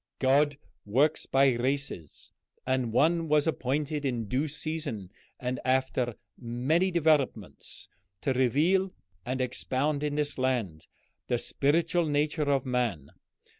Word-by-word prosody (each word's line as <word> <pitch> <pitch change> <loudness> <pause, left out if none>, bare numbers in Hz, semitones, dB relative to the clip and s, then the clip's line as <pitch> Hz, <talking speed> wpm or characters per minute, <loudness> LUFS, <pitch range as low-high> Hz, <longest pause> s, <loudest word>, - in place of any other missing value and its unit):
God 140 +2 +3 0.3
works 140 +9 +1
by 135 -1 +4
races, 130 - -3 0.3
and 130 -3 0
one 165 +7 +3
was 150 -1 +3
appointed 150 0 -1
in 120 -5 -2
due 135 +8 0
season 150 - -4 0.3
and 125 0 -2
after 130 -2 +1 0.2
many 130 +10 +1
developments 150 - 0 0.3
to 135 - +1
reveal 160 +10 +2 0.3
and 130 +1 -1
expound 135 +3 -1
in 150 -1 -1
this 150 -2 -1
land 115 -12 -1 0.4
the 120 - +1
spiritual 165 +7 +1
nature 150 0 +1
of 135 -2 +1
man. 120 - -1
135 Hz, 120 wpm, -29 LUFS, 125-150 Hz, 0.4 s, by